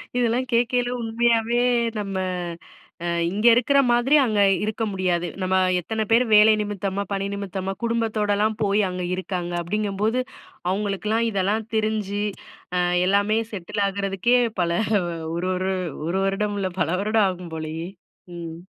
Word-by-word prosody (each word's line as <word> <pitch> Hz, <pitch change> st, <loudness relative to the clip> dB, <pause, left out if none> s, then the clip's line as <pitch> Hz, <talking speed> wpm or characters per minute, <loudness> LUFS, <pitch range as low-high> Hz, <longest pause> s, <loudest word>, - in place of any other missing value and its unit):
இதெல்லாம் 245 Hz, +1 st, +1 dB
கேக்கயில 245 Hz, +1 st, +2 dB
உண்மையாவே 230 Hz, +1 st, +1 dB, 0.4 s
நம்ம 195 Hz, -1 st, -4 dB, 0.9 s
அ -, -, -2 dB, 0.2 s
இங்க 210 Hz, +4 st, -2 dB
இருக்கிற 255 Hz, +4 st, +3 dB
மாதிரி 240 Hz, +5 st, +3 dB
அங்க 215 Hz, -4 st, 0 dB, 0.2 s
இருக்க 215 Hz, +1 st, -2 dB
முடியாது. 180 Hz, -2 st, 0 dB
நம்ம 185 Hz, 0 st, +1 dB, 0.2 s
எத்தன 220 Hz, +4 st, -2 dB
பேரு 235 Hz, +2 st, +5 dB
வேலை 210 Hz, +1 st, +8 dB
நிமித்தமா, 200 Hz, -1 st, -2 dB
பணி 195 Hz, 0 st, -1 dB
நிமித்தமா, 195 Hz, -1 st, -4 dB
குடும்பத்தோடலாம் 215 Hz, -2 st, 0 dB
போயி 205 Hz, +1 st, +2 dB
அங்க 180 Hz, 0 st, -4 dB
இருக்காங்க 180 Hz, -1 st, -3 dB
அப்டிங்கம்போது, 210 Hz, +5 st, -1 dB, 0.5 s
அவுங்களுக்கெல்லாம் 210 Hz, +3 st, 0 dB
இதெல்லாம் 210 Hz, +2 st, -1 dB
தெரிஞ்சு, 215 Hz, -2 st, -1 dB, 0.5 s
அ -, -, +2 dB, 0.3 s
எல்லாமே 200 Hz, +3 st, +2 dB
செட்டில் 200 Hz, +1 st, -4 dB
ஆகுறதுக்கே 195 Hz, +4 st, +1 dB, 0.2 s
பல, 170 Hz, -1 st, +1 dB, 0.6 s
ஒரு 180 Hz, +2 st, -2 dB
ஒரு 185 Hz, +1 st, -1 dB, 0.4 s
ஒரு 175 Hz, +3 st, 0 dB
வருடம் 205 Hz, +1 st, -1 dB
இல்ல, 190 Hz, -1 st, -2 dB
பல 160 Hz, -, +1 dB
வருடம் 215 Hz, 0 st, +2 dB
ஆகும் 180 Hz, -2 st, -7 dB
போலயே! 160 Hz, +2 st, -5 dB, 0.5 s
ம். 165 Hz, -1 st, -7 dB
205 Hz, 130 wpm, -23 LUFS, 185-225 Hz, 0.9 s, வேலை